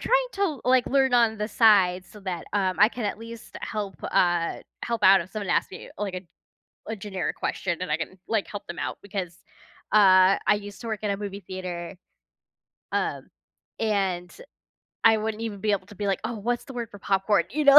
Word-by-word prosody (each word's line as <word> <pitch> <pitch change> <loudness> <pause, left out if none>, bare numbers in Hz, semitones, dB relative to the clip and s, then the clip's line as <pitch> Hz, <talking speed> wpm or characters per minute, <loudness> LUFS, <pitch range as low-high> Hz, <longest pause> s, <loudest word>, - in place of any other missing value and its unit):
trying - - +2
to, 370 -9 -1
like, 255 0 +4
learn 265 -2 +3
on 230 -2 +4
the 210 0 -2
side, 195 -6 +4
so, 210 - -14
that, 185 -4 -4
um, 190 -3 +1
I 210 - +7
can 240 -1 -5
at 205 - -2
least 230 0 -10
help, 205 -3 -4
uh, 175 -1 +1 0.2
help 235 -1 -2
out 195 0 +8
if 175 +2 -8
someone 210 -3 -5
asks - - +1
me, - - -10
like, 200 -2 -3
a 185 - -3 0.7
a 220 - -3
generic 195 -3 -3
question, 175 -3 -2
and 185 - -3
I 150 - +2
can, 165 +3 -6
like, 220 -3 0
help 205 - -7
them 170 - -7
out - - -3
because, 190 -4 -5 0.5
uh, 190 -2 +7
I - - +6
used 205 -1 -8
to 235 - -6
work 220 -1 -4
in 205 - +1
a 200 - -1
movie 200 -1 -6
theater, 180 -1 -6 1.0
um, - - -2 0.5
and 195 -5 0 0.8
I 225 -1 +7
wouldn't 220 0 -3
even 210 -3 -4
be 215 0 +1
able 190 -2 -1
to 205 - -13
be 205 +1 -3
like, 195 -1 0
"Oh, 230 +2 -2
what's 240 +3 -2
the 270 - -10
word 235 -2 -4
for 205 - -11
popcorn?" 195 +1 +2
You 300 +2 -1
know, 280 +1 +11
205 Hz, 210 wpm, -26 LUFS, 185-225 Hz, 1.0 s, know